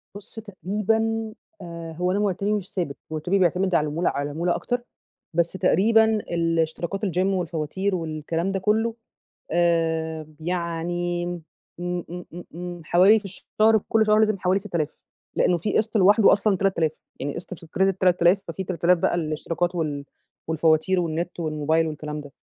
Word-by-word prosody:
بُصّ 205 Hz, +2 st, -9 dB
تقريبًا 220 Hz, +2 st, -1 dB, 0.3 s
آآ، 170 Hz, -1 st, -7 dB
هو 180 Hz, +3 st, 0 dB
أنا 195 Hz, -, +1 dB
مرتبي 200 Hz, 0 st, 0 dB
مش 200 Hz, -3 st, -4 dB
ثابت 170 Hz, -7 st, -3 dB
مرتبي 175 Hz, +5 st, 0 dB
بيعتمد 185 Hz, +1 st, +2 dB
على 155 Hz, -, +4 dB
العمولة 160 Hz, +4 st, 0 dB
على 145 Hz, +1 st, -2 dB
العمولة 170 Hz, +4 st, 0 dB
أكتر، 245 Hz, 0 st, -2 dB, 0.5 s
بس 170 Hz, +1 st, +1 dB
تقريبًا 210 Hz, +4 st, +4 dB
الاشتراكات 170 Hz, -2 st, -1 dB
الgym 185 Hz, -1 st, +1 dB
والفواتير 185 Hz, +1 st, -1 dB
والكلام 165 Hz, +2 st, -2 dB
ده 195 Hz, -, -1 dB
كلّه، 220 Hz, +4 st, +1 dB, 0.6 s
آآ، 160 Hz, -2 st, +1 dB
يعني 175 Hz, +1 st, -2 dB
م 175 Hz, -1 st, -4 dB, 0.4 s
إمم، 175 Hz, 0 st, -2 dB
إمم، 175 Hz, +1 st, -7 dB
إمم، 175 Hz, +1 st, -7 dB
إمم 175 Hz, 0 st, -6 dB
حوالي 190 Hz, +7 st, +6 dB
في 205 Hz, -, -15 dB
الشهر 215 Hz, +3 st, +2 dB
كُلّ 220 Hz, -1 st, +3 dB
شهر 215 Hz, 0 st, +4 dB
لازم 215 Hz, -2 st, +3 dB
حوالي 185 Hz, +2 st, +2 dB
6000 170 Hz, -7 st, -2 dB, 0.5 s
لإنه 175 Hz, -, +3 dB
في 200 Hz, +5 st, 0 dB
قسط 220 Hz, +1 st, +1 dB
لوحدُه 205 Hz, +2 st, +6 dB
أصلًا 205 Hz, -1 st, +2 dB
3000 175 Hz, -5 st, +1 dB, 0.3 s
يعني 140 Hz, +1 st, -3 dB
قسط 175 Hz, -, -7 dB
في 170 Hz, -, -12 dB
الcredit 190 Hz, +3 st, +1 dB
3000 180 Hz, 0 st, +4 dB
ففي 170 Hz, +3 st, -4 dB
3000 180 Hz, -1 st, +2 dB
بقى 170 Hz, -, +1 dB
للاشتراكات 165 Hz, +2 st, -2 dB
وال 150 Hz, -4 st, -2 dB, 0.4 s
والفواتير 160 Hz, +3 st, +2 dB
والنت 170 Hz, +1 st, -3 dB
والموبايل 160 Hz, 0 st, +1 dB
والكلام 150 Hz, -1 st, -5 dB
ده. 145 Hz, -1 st, -13 dB
175 Hz, 160 wpm, -24 LUFS, 165-195 Hz, 0.6 s, حوالي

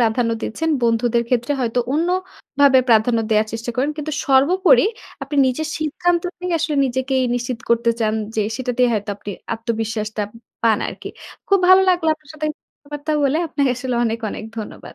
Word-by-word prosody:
প্রাধান্য 230 Hz, 0 st, +2 dB
দিচ্ছেন। 325 Hz, +8 st, -2 dB
বন্ধুদের 235 Hz, 0 st, +2 dB
ক্ষেত্রে 245 Hz, +2 st, 0 dB
হয়তো 235 Hz, 0 st, -1 dB
অন্য 325 Hz, +4 st, +1 dB, 0.5 s
ভাবে 275 Hz, -2 st, +7 dB
প্রাধান্য 230 Hz, +1 st, +4 dB
দেয়ার 215 Hz, 0 st, +3 dB
চেষ্টা 230 Hz, +1 st, -4 dB
করেন। 270 Hz, +4 st, +1 dB
কিন্তু 305 Hz, 0 st, -4 dB
সর্বোপরি 355 Hz, -, +4 dB, 0.4 s
আপনি 290 Hz, -, -4 dB
নিজের 305 Hz, +5 st, -1 dB
সিদ্ধান্ত 335 Hz, +3 st, 0 dB, 0.2 s
নিয়ে 360 Hz, -1 st, -2 dB
আসলে 310 Hz, -2 st, -1 dB
নিজেকেই 260 Hz, +1 st, 0 dB
নিশ্চিত 245 Hz, -1 st, -3 dB
করতে 235 Hz, 0 st, +3 dB
চান 215 Hz, -1 st, +1 dB, 0.2 s
যে, 215 Hz, -, +1 dB
সেটাতেই 250 Hz, -1 st, +1 dB
হয়তো 205 Hz, -1 st, -2 dB
আপনি 205 Hz, -, -8 dB, 0.2 s
আত্মবিশ্বাসটা 220 Hz, -2 st, -3 dB
উম 230 Hz, -, -14 dB, 0.2 s
পান 225 Hz, -2 st, +3 dB
আরকি। -, -, -7 dB, 0.4 s
খুব 395 Hz, -1 st, +4 dB
ভালো 375 Hz, +1 st, +8 dB
লাগলো 350 Hz, -3 st, +1 dB
আপনার 310 Hz, -1 st, -21 dB
সাথে 305 Hz, 0 st, -3 dB, 0.4 s
আ -, -, -17 dB
বার্তা 295 Hz, +1 st, -3 dB
বলে। 280 Hz, +3 st, +2 dB
আপনাকে 285 Hz, -2 st, -2 dB
আসলে 255 Hz, 0 st, -3 dB
অনেক, 225 Hz, 0 st, -1 dB
অনেক -, -, -6 dB
ধন্যবাদ। 215 Hz, -, -8 dB
250 Hz, 175 wpm, -20 LUFS, 230-305 Hz, 0.5 s, ভালো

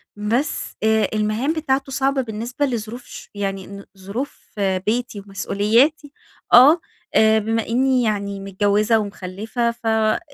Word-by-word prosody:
بس 230 Hz, +8 st, -2 dB
آآ، 220 Hz, 0 st, +3 dB
المهام 215 Hz, +8 st, 0 dB
بتاعتُه 275 Hz, -4 st, -1 dB
صعبة 270 Hz, 0 st, +1 dB
بالنسبة 240 Hz, +5 st, -3 dB
لظروف 235 Hz, -1 st, -4 dB
ش -, -, -11 dB
يعني 195 Hz, -2 st, -3 dB
ن 200 Hz, 0 st, -10 dB
ظروف 205 Hz, +9 st, -6 dB
بيتي 205 Hz, +4 st, -1 dB
ومسؤولياتي، 220 Hz, +9 st, +1 dB, 0.4 s
آه 280 Hz, +8 st, +8 dB, 0.4 s
آآ 220 Hz, 0 st, +5 dB
بما 225 Hz, +1 st, -1 dB
إني 255 Hz, +1 st, +2 dB
يعني 200 Hz, -2 st, -2 dB
متجوِّزة 205 Hz, +3 st, +1 dB
ومخلِّفة، 210 Hz, +4 st, -3 dB
ف 235 Hz, -, -17 dB
آآ، 220 Hz, -1 st, +2 dB
220 Hz, 130 wpm, -21 LUFS, 205-255 Hz, 0.4 s, آه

